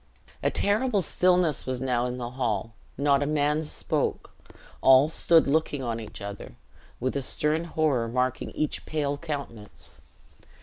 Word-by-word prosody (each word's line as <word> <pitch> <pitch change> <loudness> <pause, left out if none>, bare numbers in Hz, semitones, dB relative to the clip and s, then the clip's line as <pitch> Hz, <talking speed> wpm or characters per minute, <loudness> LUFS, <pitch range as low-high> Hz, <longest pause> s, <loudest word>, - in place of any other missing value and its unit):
A - - +2
terrible 210 0 +1
stillness 180 -4 +3
was 130 -1 -2
now 125 -1 0
in 125 0 -4
the 120 -1 -5
hall. 115 -4 -2 0.2
Not 140 -1 +3
a 145 - 0
man 150 +1 +1
spoke; 150 - -2 0.5
all 135 +3 +6
stood 165 0 +4
looking 145 -1 0
on 115 -2 -2
each 110 -1 -9
other, 100 -11 -8 0.4
with 130 +2 -2
a 140 - 0
stern 150 +5 0
horror 150 -8 0
marking 125 +2 -1
each 155 - -2
pale 145 -2 -1
countenance. 140 -9 -7
140 Hz, 145 wpm, -26 LUFS, 125-155 Hz, 0.5 s, all